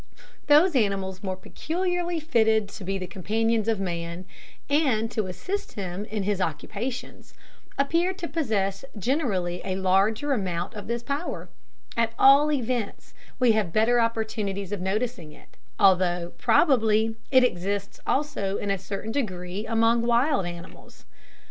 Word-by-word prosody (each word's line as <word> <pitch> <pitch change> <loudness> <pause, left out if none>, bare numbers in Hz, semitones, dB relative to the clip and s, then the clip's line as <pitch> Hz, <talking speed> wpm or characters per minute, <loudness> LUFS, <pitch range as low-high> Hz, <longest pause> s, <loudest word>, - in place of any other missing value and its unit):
Those 305 +3 +6
animals 195 -5 0
more 190 -2 -3
peculiarly 350 - -2
fitted 220 -8 +2
to 200 - -9
be 195 +1 -2
the 185 - -4
companions 220 +4 0
of 225 -3 +1
man, 170 -1 -4 0.4
and 260 -7 +1
to 215 -5 -1
assist 370 - -4
him 195 -1 -4
in 215 -2 -3
his 200 -1 0
occupations, 235 - -5 0.4
appear 335 +6 +2
to 360 -2 -5
possess 220 - -1
generally 200 - -1
a 190 -1 -2
larger 195 +9 +2
amount 185 -4 -2
of 210 -2 -8
this 235 +1 -2
power; 285 +7 -4 0.5
at 230 -1 +1
all 280 +3 +6
events, 245 -6 -2 0.2
we 250 -2 +4
have 215 -6 +1
better 230 +5 +3
opportunities 215 -4 -2
of 205 -3 -3
noticing 195 -4 -2
it, - - -19 0.2
although, 175 -2 +3
probably, 225 -3 +3
it 260 -1 +6
exists 200 -2 -1
also 235 -9 0
in 205 - -2
a 195 - 0
certain 200 +3 -5
degree 190 -5 -3
among 230 +1 +3
wild 240 - +2
animals. 175 -1 -11
220 Hz, 140 wpm, -26 LUFS, 190-250 Hz, 0.5 s, Those